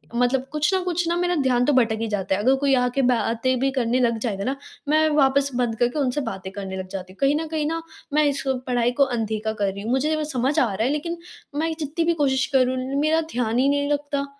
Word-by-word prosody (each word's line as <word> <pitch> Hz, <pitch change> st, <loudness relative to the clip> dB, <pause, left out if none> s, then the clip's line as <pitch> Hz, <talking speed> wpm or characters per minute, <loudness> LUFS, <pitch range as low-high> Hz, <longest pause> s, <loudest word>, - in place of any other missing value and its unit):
मतलब 250 Hz, +2 st, +1 dB
कुछ 300 Hz, +4 st, +1 dB
न 375 Hz, -, +2 dB
कुछ 355 Hz, -1 st, -1 dB
ना 340 Hz, -, +1 dB
मेरा 355 Hz, 0 st, +1 dB
ध्यान 255 Hz, -4 st, +2 dB
तो 295 Hz, -, +2 dB
भटक 230 Hz, -4 st, +3 dB
ही 225 Hz, -, -1 dB
जाता 195 Hz, -2 st, -1 dB
है 205 Hz, -, -2 dB
अगर 260 Hz, +5 st, +4 dB
कोई 275 Hz, 0 st, +1 dB
आ 250 Hz, -1 st, +2 dB
के 275 Hz, -, +2 dB
बातें 235 Hz, +2 st, 0 dB
भी 270 Hz, +1 st, +1 dB
करने 250 Hz, -1 st, 0 dB
लग 235 Hz, -2 st, +2 dB
जाएगा 205 Hz, -4 st, -2 dB
ना, 265 Hz, +4 st, -1 dB, 0.3 s
मैं 310 Hz, +1 st, +4 dB
वापस 280 Hz, -1 st, +3 dB
बंद 240 Hz, -2 st, 0 dB
करके 245 Hz, +5 st, +1 dB
उनसे 275 Hz, +1 st, 0 dB
बातें 190 Hz, -5 st, -5 dB
करने 195 Hz, -2 st, -5 dB
लग 185 Hz, 0 st, -5 dB
जाती 185 Hz, -1 st, -7 dB
हूँ, -, -, -24 dB
कहीं 275 Hz, +2 st, +3 dB
न 325 Hz, -, -5 dB
कहीं 310 Hz, -1 st, -2 dB
ना 330 Hz, +1 st, -2 dB, 0.3 s
मैं 305 Hz, +1 st, +4 dB
इस 280 Hz, -, -3 dB, 0.2 s
पढ़ाई 245 Hz, -1 st, +1 dB
को -, -, +9 dB
अनदेखा 220 Hz, -4 st, -2 dB
कर 200 Hz, -2 st, -1 dB
रही 200 Hz, -, -7 dB
हूँ। 230 Hz, -, -2 dB
मुझे 305 Hz, +4 st, +1 dB
समझ 265 Hz, +4 st, 0 dB
आ 225 Hz, -6 st, +2 dB
रहा 215 Hz, +4 st, -1 dB
है 255 Hz, -, +2 dB
लेकिन 335 Hz, +3 st, -3 dB, 0.4 s
मैं 320 Hz, +2 st, 0 dB
जितनी 315 Hz, +3 st, -2 dB
भी 340 Hz, -, +3 dB
कोशिश 265 Hz, -1 st, +2 dB
करूँ 255 Hz, 0 st, +3 dB, 0.2 s
मेरा 320 Hz, +2 st, +2 dB
ध्यान 240 Hz, 0 st, 0 dB
ही 275 Hz, -, +3 dB
नहीं 285 Hz, 0 st, +1 dB
लगता। 285 Hz, -1 st, -1 dB
260 Hz, 250 wpm, -23 LUFS, 230-295 Hz, 0.4 s, को